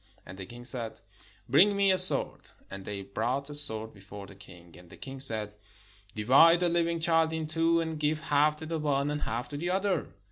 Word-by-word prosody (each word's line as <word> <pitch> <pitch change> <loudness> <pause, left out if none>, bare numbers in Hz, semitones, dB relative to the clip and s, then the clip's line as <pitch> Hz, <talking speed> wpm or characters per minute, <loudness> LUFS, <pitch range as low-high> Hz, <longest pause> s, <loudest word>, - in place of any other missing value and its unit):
And 95 - -12
the 95 - -9
king 120 +2 -13
said, 120 -2 -2 0.5
"Bring 185 +11 +3
me 200 -1 +2
a 185 - +1
sword." 185 - +5 0.2
And 95 -1 -10
they 100 -1 -7
brought 125 +8 -4
a - - -8
sword 110 -7 +1
before 100 0 -13
the 100 - -15
king. 90 -3 -17
And 90 -1 -17
the - - -15
king 135 0 -10
said, 110 -5 +2 0.6
"Divide 140 +11 +4
the 175 - +1
Hving 170 0 -2
child 165 -1 +2
in 160 -1 -4
two, 165 +2 0
and 160 -1 -6
give 150 +1 -2
half 150 -1 0
to 155 +1 -10
the 160 0 -5
one, 145 -1 -2
and 150 0 -5
half 115 +3 -5
to 145 - -7
the 175 +4 -4
other." 190 - -3
145 Hz, 215 wpm, -27 LUFS, 110-165 Hz, 0.6 s, sword